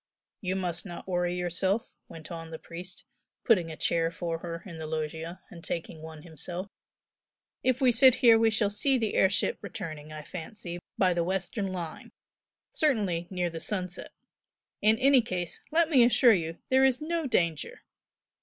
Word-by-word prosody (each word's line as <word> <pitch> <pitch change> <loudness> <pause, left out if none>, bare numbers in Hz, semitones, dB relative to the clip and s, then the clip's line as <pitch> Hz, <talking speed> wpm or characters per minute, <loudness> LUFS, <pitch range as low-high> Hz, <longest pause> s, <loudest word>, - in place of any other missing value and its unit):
"You 185 -2 -1
must 175 -2 -2
not 175 -2 -8
worry 175 -1 0
yourself," 180 +4 -1
went 160 +1 -11
on 165 -1 -6
the 160 - -6
priest, 175 +3 -10 0.4
putting 185 -9 +3
a 160 - -7
chair 165 -1 +1
for 165 -1 -4
her 170 -1 -6
in 170 -4 -9
the 160 - -5
loggia, 160 +2 -4
and 170 -1 -11
taking 165 -2 -5
one 160 -1 -10
himself 175 +4 -6 0.9
"If 255 +1 +1
we 255 -2 +6
sit 255 +2 +7
here 230 -2 +6
we 225 0 +4
shall 220 -2 +1
see 260 +6 +2
the 225 -3 -1
air 190 - +4
ship 200 - 0
returning, 155 -8 -7
I 155 0 -7
fancy, 175 +1 -7 0.2
by 185 -2 +3
the 170 -1 +1
western 190 +3 -2
line, 175 -4 -6 0.6
certainly 205 - +1
near 180 -2 -1
the 165 - -6
sunset. 185 -1 -4 0.7
In 215 +2 +4
any 270 +1 +5
case 180 -6 -4
let 330 +1 +3
me 275 -6 +6
assure 240 0 +6
you 165 -3 -2
there 265 +1 +5
is 265 -1 +4
no 325 0 -2
danger!" 170 - 0
180 Hz, 175 wpm, -29 LUFS, 165-225 Hz, 0.9 s, sit